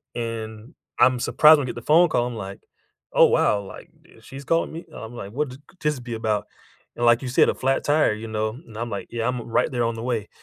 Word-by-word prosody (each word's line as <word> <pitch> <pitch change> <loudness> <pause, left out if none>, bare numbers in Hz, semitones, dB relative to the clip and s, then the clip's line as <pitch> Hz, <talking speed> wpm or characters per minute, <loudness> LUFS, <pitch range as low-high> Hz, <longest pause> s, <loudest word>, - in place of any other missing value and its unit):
and 115 +2 -6 0.2
I'm 125 0 +5
surprised 155 +5 +6
when 140 - -2
I - - -5
get - - -12
the 120 - -7
phone 170 +3 +7
call, 120 -5 +1
I'm 120 - -6
like, 100 -2 -7 0.5
"Oh, - - +7
wow." 105 - +2
like, 95 - -11 0.3
uh, - - -19
"She's 135 +1 -11
calling 165 +4 +1
me?" 165 +2 -8
and - - -17
I'm 110 +2 -9
like, 100 -4 -7
"What 145 +2 -1
th 130 - -11 0.2
this 150 -3 0
be 120 -1 -7
about?" 110 -2 -1 0.5
and 120 - -1
like 120 0 +5
you 130 - -5
said, 125 - +4
a - - +1
flat 135 +1 0
tire, 145 -6 +3
you 110 +1 -7
know? 110 0 -1 0.2
And 110 -2 -12
I'm 120 +1 -3
like, 100 - -5
"Yeah, 115 -1 -2
I'm 125 -1 -2
r - - -11
right 115 - +1
there 120 -2 0
on 115 0 -1
the 115 - -6
way," 115 -4 -2
120 Hz, 265 wpm, -23 LUFS, 110-130 Hz, 0.5 s, phone